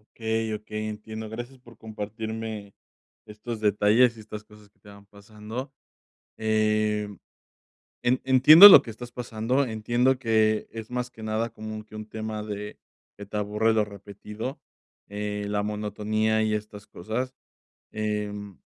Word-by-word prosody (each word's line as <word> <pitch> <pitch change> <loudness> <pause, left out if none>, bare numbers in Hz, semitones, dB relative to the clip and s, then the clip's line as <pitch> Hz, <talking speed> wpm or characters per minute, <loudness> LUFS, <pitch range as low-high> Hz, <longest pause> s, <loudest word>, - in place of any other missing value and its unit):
Okey 110 -1 -1
okey, 105 0 -5
entiendo, 110 +1 -7
gracias 120 +4 -8
por 120 -3 -17
compartirme 110 -1 -6 0.5
estos 110 +1 -7
detalles 110 +3 +3
y - - -11
estas 105 -1 -9
cosas 105 -1 -19
que - - -41
te 105 - -17
van 100 0 -15
pasando, 105 +6 -9 0.7
eh, 110 -1 +1 0.9
en 125 +1 +1
entiendo 140 +8 +10
lo 200 - +10
que 115 - -11
estás 120 +2 -10
pasando, 120 +2 -1
entiendo 120 +3 +1
que 110 -3 +2
es 110 -1 -8
más 125 0 -3
que 110 - -13
nada 110 +2 -1
como 110 0 -8
que 110 - -14
un 110 0 -6
tema 110 -1 -5
de 105 -1 -7 0.4
que 100 - -8
te 105 +1 -5
aburre 105 +2 +1
lo 110 -1 +2
repetido, 105 +5 -8 0.5
eh, 105 0 -4
la 105 0 -1
monotonía 105 +1 -1
y 110 - 0
estas 105 -1 -5
cosas, 115 +8 -4 0.6
em 105 -2 -4
110 Hz, 145 wpm, -26 LUFS, 105-115 Hz, 0.9 s, entiendo